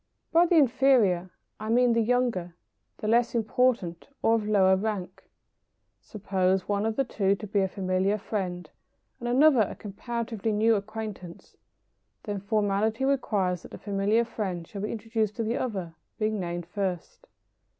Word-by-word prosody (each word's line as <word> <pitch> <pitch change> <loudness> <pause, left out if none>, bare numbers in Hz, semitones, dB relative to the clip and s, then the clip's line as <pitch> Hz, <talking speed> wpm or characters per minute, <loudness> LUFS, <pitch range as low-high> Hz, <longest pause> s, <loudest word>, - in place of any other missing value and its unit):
By 345 +1 +5
the 345 - +2
inferior 245 - +4 0.3
I 215 +1 -5
mean 245 +1 +4
the 230 - +2
younger, 225 -7 0 0.4
the 215 - -5
less 235 +2 +2
important, 225 -6 0 0.2
or 225 - +4
of 220 -2 0
lower 190 -3 +4
rank. 200 -2 -4 0.7
Suppose 190 -2 -1
one 205 +1 0
of 225 - -1
the 275 - +2
two 200 -5 +1
to 210 - -8
be 205 0 0
a 190 - +2
familiar 190 +1 0
friend, 180 -5 -4 0.5
and 240 - -3
another 265 0 +5
a 205 - -1
comparatively 225 +1 -4
new 220 +2 +3
acquaintance, 210 -4 -6 0.7
then 205 -2 -3
formality 210 +4 0
requires 200 -10 0
that - - -12
the - - -9
familiar 205 +3 +1
friend 190 -7 -4
shall 200 - -7
be 210 - -3
introduced 220 -1 -2
to 230 - -2
the 225 +2 -1
other, 190 -9 -3 0.2
being 215 -1 -1
named 175 -1 -4
first. 180 -1 -4
210 Hz, 155 wpm, -27 LUFS, 190-230 Hz, 0.7 s, By